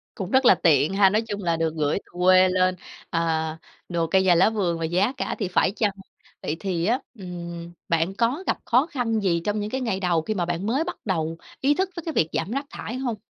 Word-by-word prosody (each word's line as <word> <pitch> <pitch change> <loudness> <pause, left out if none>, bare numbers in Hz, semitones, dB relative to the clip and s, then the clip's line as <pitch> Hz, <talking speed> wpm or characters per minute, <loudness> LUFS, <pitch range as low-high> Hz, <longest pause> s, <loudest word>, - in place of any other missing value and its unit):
Cũng 190 -1 -5
rất 260 0 +4
là - - +8
tiện 155 +2 +3
ha! 195 -1 +5
Nói 215 +2 +2
chung 205 -1 -4
là 170 -1 +1
được 165 -1 -1
gửi 150 +2 0
từ - - -21
quê 185 0 +6
lên, 185 0 +2 0.4
à, 160 -2 0 0.3
đồ 170 -2 0
cây 190 +2 +3
nhà 180 -2 +5
lá 185 +5 +5
vườn 185 -6 -1
và 165 - -3
giá 185 +9 +1
cả - - -2
thì 200 -5 -1
phải 180 - +2
chăng. 210 -3 +2 0.5
Vậy 155 - -2
thì 180 -4 -1
á, 245 +4 +2 0.2
ừm, 170 -2 -7 0.2
bạn 165 +3 +1
có 245 - 0
gặp - - 0
khó 255 +5 +3
khăn 235 -7 -1
gì 170 -4 +1
trong 210 0 -1
những 210 +1 -3
cái 265 - -2
ngày 210 -6 -1
đầu 175 -4 +1
khi 215 - -2
mà 175 -3 0
bạn 175 +3 -2
mới 270 +8 +1
bắt 355 - -5
đầu 165 -5 -1 0.2
ý 285 +2 +3
thức 380 +2 -1
tới 340 - -4
cái 325 - -3
việc 160 - +2
giảm - - -2
rác 275 +4 -2
thải 245 - -6
hông? 245 -4 -2
190 Hz, 250 wpm, -24 LUFS, 170-225 Hz, 0.5 s, là